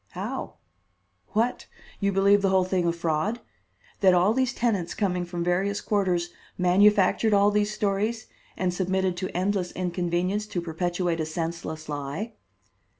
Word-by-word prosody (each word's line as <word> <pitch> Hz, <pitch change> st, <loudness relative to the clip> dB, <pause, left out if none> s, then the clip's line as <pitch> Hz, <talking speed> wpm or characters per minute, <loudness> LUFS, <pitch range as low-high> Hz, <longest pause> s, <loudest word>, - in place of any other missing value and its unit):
"How? -, -, -5 dB, 0.8 s
What? 230 Hz, +4 st, 0 dB, 0.3 s
You 200 Hz, -1 st, +1 dB
believe 200 Hz, +1 st, +4 dB
the 195 Hz, -, +2 dB
whole 190 Hz, -1 st, +3 dB
thing 180 Hz, -1 st, 0 dB
a -, -, +3 dB
fraud? 170 Hz, +6 st, -1 dB, 0.6 s
That 190 Hz, -2 st, +5 dB
all 185 Hz, +5 st, +4 dB
these 260 Hz, 0 st, +1 dB
tenants 210 Hz, -9 st, -1 dB
coming 180 Hz, -4 st, 0 dB
from 175 Hz, -1 st, -4 dB
various 190 Hz, +3 st, 0 dB
quarters 180 Hz, -4 st, 0 dB, 0.3 s
manufactured 200 Hz, +3 st, +4 dB
all 200 Hz, +1 st, +4 dB
these 210 Hz, 0 st, +1 dB
stories 210 Hz, +2 st, -1 dB, 0.3 s
and 180 Hz, -1 st, 0 dB
submitted 185 Hz, 0 st, 0 dB
to 185 Hz, +1 st, -3 dB
endless 185 Hz, -1 st, 0 dB
inconvenience 180 Hz, +3 st, -1 dB
to 180 Hz, -, -3 dB
perpetuate 175 Hz, +1 st, -2 dB
a 160 Hz, -, 0 dB
senseless 160 Hz, -1 st, -4 dB
lie?" 145 Hz, +10 st, -4 dB
185 Hz, 145 wpm, -26 LUFS, 175-205 Hz, 0.8 s, That